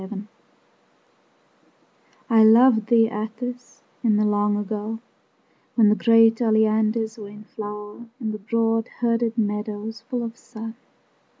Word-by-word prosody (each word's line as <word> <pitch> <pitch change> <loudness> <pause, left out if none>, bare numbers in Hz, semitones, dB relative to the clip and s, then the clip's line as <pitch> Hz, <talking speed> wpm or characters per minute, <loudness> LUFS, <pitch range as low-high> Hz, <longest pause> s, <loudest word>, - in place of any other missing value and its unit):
XXIII 200 +1 -7 2.0
I 225 -3 +5
loved 225 0 +5
thee, 230 -1 +4
Atthis, 240 +3 -7 0.2
in 220 -3 +3
the 210 - +2
long 205 0 +1
ago, 210 +2 -4 0.8
When 220 -3 +5
the 210 - +4
great 225 0 +4
oleanders 220 0 +1
were 205 -1 -8
in 210 +1 -12
flower 210 +2 -8
In 220 -4 -3
the 215 - -6
broad 225 +2 0
herded 230 -1 0
meadows 210 +1 -3
full 245 +1 -4
of 230 0 -6
sun. 225 -2 -9
220 Hz, 125 wpm, -23 LUFS, 210-230 Hz, 2.0 s, I